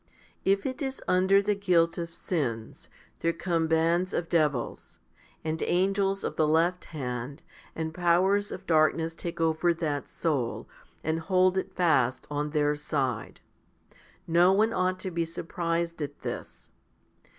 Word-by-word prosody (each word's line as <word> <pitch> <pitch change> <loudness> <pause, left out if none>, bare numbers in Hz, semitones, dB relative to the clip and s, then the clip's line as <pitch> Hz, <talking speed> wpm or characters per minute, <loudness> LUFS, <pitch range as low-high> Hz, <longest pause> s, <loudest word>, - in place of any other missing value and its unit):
If 195 +1 +2
it 260 +3 -3
is 265 -1 -3
under 190 +2 +4
the 210 +1 +2
guilt 175 -4 +2
of 170 0 -4
sins, 120 -12 -3 0.3
there 165 - +1
come 165 -1 -1
bands 165 +3 +2
of 165 - -2
devils, 150 -7 -1 0.4
and 160 0 -2
angels 195 +2 +1
of - - -3
the 155 - +3
left 170 +3 +2
hand, 130 -1 -5 0.3
and 160 -1 -3
powers 185 +4 +2
of 190 - -7
darkness 160 0 +2
take 170 +1 -6
over 165 +1 +2
that 150 -4 -2
soul, 140 -8 -2 0.4
and 160 +1 0
hold 185 +2 +3
it 190 - -3
fast 130 -8 +2
on 145 +1 -1
their 150 -1 +1
side. 135 -6 -2 0.8
No 175 +2 +5
one 220 +3 +3
ought 185 -1 0
to 185 - -4
be 170 0 0
surprised 170 0 -3
at 145 -1 -5
this. - - -7
165 Hz, 145 wpm, -28 LUFS, 155-185 Hz, 0.8 s, No